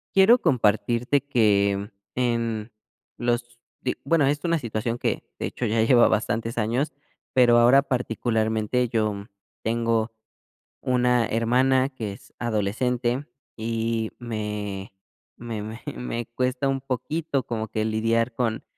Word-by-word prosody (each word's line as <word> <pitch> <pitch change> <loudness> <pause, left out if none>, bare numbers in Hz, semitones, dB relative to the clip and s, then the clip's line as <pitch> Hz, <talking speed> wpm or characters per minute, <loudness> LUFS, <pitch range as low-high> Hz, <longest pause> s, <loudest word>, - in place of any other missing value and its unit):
Quiero 205 +6 +7
compartirte 120 - +2
que, 105 -6 +2 0.2
en 115 -3 -1 0.5
los 120 0 -1 0.2
de 125 - -2
bueno, 165 -4 +3
es 145 +1 +1
una 170 -1 +2
situación 115 -2 -3
que, - - -1 0.2
de - - -2
hecho, 125 - -3
ya 110 +1 +2
lleva 120 +1 +6
bastantes 115 +1 -1
años, 120 +7 0 0.4
pero 120 -2 +6
ahora 125 +4 +6
particularmente 115 -2 0
yo 105 -3 -1 0.4
tengo 115 0 0 0.7
una 125 -2 +2
hermana 130 +4 +2
que 110 -7 -5
es 100 +1 -14
adolescente 120 +4 0 0.3
y 115 0 -1
me 105 -4 -4 0.4
me 115 -3 -5
me 110 +2 -7 0.2
me 120 -1 -4
cuesta 125 +1 0
un 135 0 0
poquito 140 +3 -2
como 110 -2 -3
que 110 +1 -1
lidiar 115 +2 +1
con 115 -3 -1
115 Hz, 125 wpm, -25 LUFS, 110-125 Hz, 0.7 s, Quiero